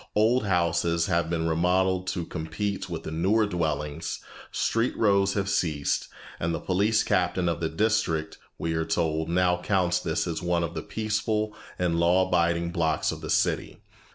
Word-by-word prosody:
Old 110 +3 +3
houses 85 -2 +1
have 85 -3 0
been 80 -1 0
remodelled 90 +3 +1
to 90 -2 -2
compete 90 +5 -4
with 80 -2 -5
the - - -5
newer 95 +7 +2
dwellings, 80 -4 -2 0.3
street 115 +2 0
rows 100 -2 +3
have 100 -1 0
ceased, 80 -7 0 0.3
and 85 0 -1
the - - -3
police 105 +4 +2
captain 90 0 +1
of 85 -1 0
the 80 -1 -1
district, 85 -4 0 0.2
we 80 0 -2
are 80 0 0
told, 80 -1 -1
now 90 0 +2
counts 90 -2 +1
this - - -1
as 80 -2 -3
one 85 -1 +1
of 85 0 -3
the 80 - -4
peaceful 110 +1 -1 0.2
and 85 -2 0
law 90 +2 +4
abiding 85 -1 +1
blocks 80 -3 +1
of - - -7
the - - -6
city. - - 0
85 Hz, 170 wpm, -27 LUFS, 80-95 Hz, 0.3 s, law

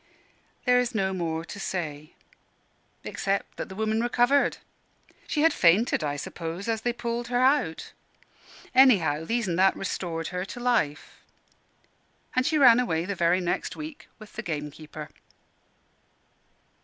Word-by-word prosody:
There 250 -1 +5
is 245 -1 -1
no 190 -2 0
more 165 -2 -3
to 200 - -8
say, 155 -6 -5 0.9
except 195 0 -2
that - - -5
the 190 - -8
woman 220 +1 0
recovered. 245 +4 +2 0.7
She 300 - 0
had 325 -1 +5
fainted, 180 - +3
I 145 -1 -1
suppose, 165 +6 -6
as 225 -1 -1
they 240 - 0
pulled 235 0 -4
her 245 0 0
out. 260 - +1 0.8
Anyhow, 180 - +5
These 235 +2 -1
an' 170 -2 -1
That 190 +1 +4
restored 170 -4 -3
her 180 0 -3
to 200 - -8
life 235 -13 -1 1.2
and 255 +1 +2
she 315 - +2
ran 250 -4 +7
away 170 -10 0
the 200 - -2
very 175 0 +2
next 175 - -2
week 310 -1 -9
with 215 -2 -14
the 215 - -5
gamekeeper. 150 -3 -6
195 Hz, 145 wpm, -26 LUFS, 165-245 Hz, 1.2 s, ran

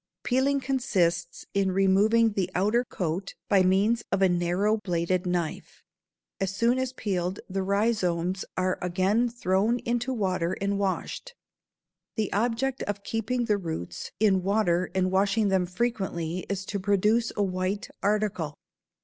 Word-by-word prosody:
Peeling 270 +2 +2
consists 180 -11 0
in 195 -1 +2
removing 205 +4 +4
the 190 -3 -1
outer 210 +6 +2
coat 185 -4 -3
by 195 -2 +4
means 200 +5 +3
of 195 0 +2
a - - +7
narrow 180 +5 +1
bladed 180 -2 -1
knife. 175 -3 -3 0.6
As 195 - 0
soon 230 +6 +1
as 260 -1 -1
peeled 190 -6 -2
the 195 0 -2
rhizomes 190 -3 0
are 185 0 0
again 190 +7 +1
thrown 220 0 +1
into 240 +1 -1
water 185 -7 0
and 200 0 -1
washed. 200 - -3 0.8
The 215 -3 -1
object 240 +5 0
of 205 -1 -4
keeping 235 +3 -1
the 210 -2 +1
"roots" 160 - -5
in 200 -3 +4
water 185 -2 +1
and 185 -1 +1
washing 200 +2 +2
them 190 -2 +2
frequently 185 -5 -2
is 195 -1 -2
to 200 - -3
produce 210 +4 +2
a 205 - +2
white 185 +1 -2
article. 200 -7 0
195 Hz, 140 wpm, -27 LUFS, 185-220 Hz, 0.8 s, a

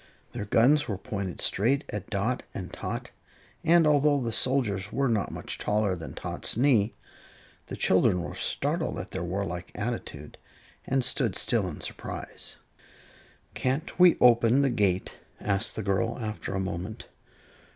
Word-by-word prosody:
Their 105 - -5
guns 135 +8 +4
were 100 -5 -2
pointed 100 -4 -5
straight 135 +9 +2
at 105 +1 -5
Dot 110 +4 -1
and 95 - -6
Tot, - - -5 0.5
and 170 0 +5
although 145 -1 +4
the 120 -3 -2
soldiers 110 -6 +1
were 135 +2 +1
not 110 -4 0
much - - -5
taller 105 -2 +1
than 80 -2 -8
Tot's - - -3
knee, 120 -5 +3 0.7
the - - -5
children 95 -1 +3
were - - -5
startled - - -1
at - - -6
their - - -4
warlike 90 -1 -4
attitude 105 -10 -5 0.5
and 135 -1 +1
stood 120 -6 +1
still 110 -6 +1
in 85 - -7
surprise. - - -5 1.0
"Can't 135 +8 -2
we 180 -1 +7
open 120 +2 +5
the 135 - +2
gate?" 95 -5 0 0.2
asked 100 +2 0
the 110 - -3
girl, 100 +4 0
after 110 -4 -4
a - - 0
moment. 95 +2 -5
110 Hz, 150 wpm, -28 LUFS, 95-130 Hz, 1.0 s, we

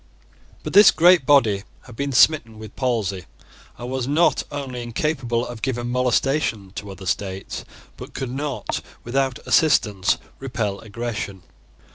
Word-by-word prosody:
But - - -5
this 205 0 +9
great 175 -4 +5
body 115 -9 +4 0.2
had 120 - -13
been 140 +3 -2
smitten 125 -4 +4
with 110 -1 -11
palsy, 105 -8 -1 0.5
and 120 - -7
was 130 -2 -2
not 155 +5 +3
only 135 -4 -5
incapable 120 -1 -1
of 120 -2 -8
giving 120 -1 -2
molestation 125 -4 0
to 105 - -7
other 95 0 -9
states, 95 +1 -3 0.3
but - - -10
could 130 -2 -4
not, 140 +1 -3 0.2
without 130 +1 0
assistance, 105 - +3 0.2
repel 115 -7 -3
aggression. 105 -4 -5
120 Hz, 135 wpm, -22 LUFS, 105-135 Hz, 0.5 s, this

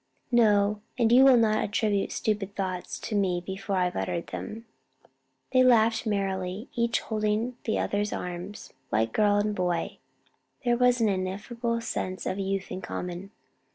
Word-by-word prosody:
"No; 210 -3 +3 0.2
and 230 -2 +3
you 255 +2 +8
will 265 -2 +7
not 215 -2 +3
attribute 205 -1 0
stupid 205 -2 -2
thoughts 185 -2 -3
to - - -5
me 190 -4 +1
before 195 +2 -4
I've 180 -1 +1
uttered 95 - -2
them." 225 +2 -7 0.9
They 255 - +6
laughed 230 -2 +4
merrily, 195 0 -2
each 235 -1 +1
holding 215 +2 -1
the 220 - 0
other's 205 +1 -1
arms, 180 +3 -6 0.2
like 110 +1 +1
girl 205 -1 +3
and 210 +1 +1
boy. 180 -3 -2 0.7
There 240 0 +3
was 245 0 +4
the 225 -2 +2
ineffable 215 +5 -2
sense 185 -5 -4
of 185 - -2
youth 195 0 -2
in 185 0 -4
common. 180 +2 -5
205 Hz, 155 wpm, -27 LUFS, 185-225 Hz, 0.9 s, you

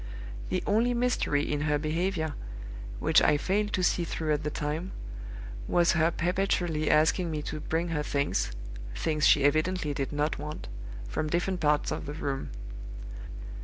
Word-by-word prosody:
The 185 - 0
only 235 +4 +3
mystery 235 -12 +2
in 145 -1 -1
her 150 0 +2
behavior, 160 +1 0 0.6
which - - +5
I 150 - +5
failed 205 +6 +1
to 185 - +1
see 175 - +3
through 160 -2 -1
at 150 - 0
the 150 - 0
time, 150 +5 -3 0.7
was 175 -1 +4
her 165 -1 +4
perpetually 175 -3 +1
asking 160 +3 +4
me 155 -2 -2
to 155 - -4
bring 165 +3 -1
her 155 -2 0
things 140 -1 0 0.4
(things 155 -2 +2
she 145 - +6
evidently 155 +2 +2
did 135 -1 -2
not 150 0 0
want) 150 +1 -5 0.4
from 155 - -1
different 180 +3 0
parts 150 -1 +2
of - - -3
the 145 - -3
room. 140 -3 -3
155 Hz, 160 wpm, -29 LUFS, 150-180 Hz, 0.7 s, she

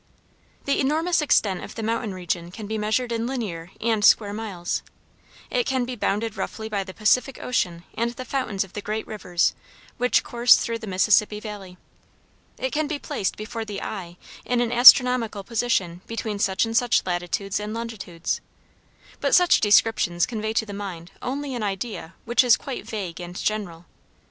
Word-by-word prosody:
The 280 - +1
enormous 320 +5 +2
extent 205 -10 +2
of - - -9
the 225 - -4
mountain 225 -1 -1
region 175 -2 -3
can 210 +4 -8
be 220 +1 -3
measured 220 +4 0
in 230 0 -1
linear 200 -10 -4
and 220 -2 0
square 205 0 +5
miles; 205 -5 -3 0.7
it - - +1
can 260 -2 0
be 250 0 -5
bounded 220 0 -1
roughly 220 -1 -4
by 205 -3 -2
the 190 - -9
Pacific 235 +6 +2
Ocean 175 -9 -1
and 235 +1 0
the 250 +2 -8
fountains 230 -7 -1
of 195 - -15
the 205 - -5
great 215 +2 -3
rivers 180 -5 0 0.4
which 250 +1 +2
course 240 +1 +5
through 230 0 -2
the 220 - -8
Mississippi 210 +2 +3
valley; 205 -4 -8 0.8
it 260 - -2
can 305 0 0
be 300 0 -2
placed 195 -8 -3
before 220 +1 -5
the 205 -2 -5
eye 175 -4 -6 0.3
in 245 -1 0
an 240 -1 +1
astronomical 245 -3 +7
position 195 -6 -1
between 220 -2 -4
such 195 +1 +2
and 225 0 -4
such 240 0 +3
latitudes 180 +3 -2
and 210 0 -5
longitudes, 220 -7 -4 0.8
but - - +3
such 360 -1 +5
descriptions 205 -4 +3
convey 220 -2 -3
to 220 0 0
the 205 - -8
mind 185 -4 -7
only 275 +2 -3
an 240 - -3
idea 195 -3 -4
which 235 +2 +4
is 245 -2 +5
quite 270 -3 -6
vague 185 -5 -5
and 175 0 -8
general. 180 -5 -3
215 Hz, 175 wpm, -24 LUFS, 195-240 Hz, 0.8 s, astronomical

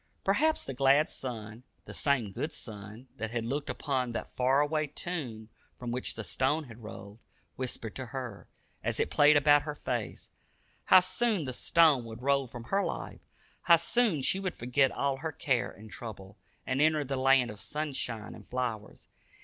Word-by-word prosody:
Perhaps 305 +11 +2
the 135 - -5
glad 140 +3 +4
sun, 115 -3 -6 0.2
the - - -8
same 130 -8 +2
good 150 - -3
sun 110 +1 -9
that 110 0 -3
had 120 0 -3
looked 140 +5 -3
upon 130 -5 -1
that - - -5
far 130 +2 +3
away 155 +1 +1
tomb 135 -9 -5 0.3
from 120 -1 -5
which 125 +1 -2
the 115 - -5
stone 140 +8 0
had 120 -4 -12
rolled, 105 -1 -10 0.4
whispered 120 -4 -4
to 130 -1 -5
her, 120 -4 -6 0.4
as - - -1
it - - 0
played 150 +1 +6
about 145 0 +6
her 150 0 -5
face, 120 -6 -4 0.5
how 185 - +8
soon 205 -2 0
the 130 - -3
stone 155 -1 +4
would 115 +1 -9
roll 140 -1 +2
from 120 0 -9
her 195 +10 0
life; - - -5 0.4
how 170 -1 +7
soon 175 - +1
she 190 - +2
would 190 -2 -3
forget 125 +3 +2
all 140 -1 -1
her 160 +3 -4
care 125 -6 0
and 110 +2 -13
trouble, 100 -4 -8 0.3
and 130 +2 0
enter 155 -1 +3
the 135 0 -3
land 130 -2 +4
of 105 - -9
sunshine 130 -8 -3
and - - -14
flowers. 120 -4 -4
130 Hz, 180 wpm, -30 LUFS, 115-150 Hz, 0.5 s, how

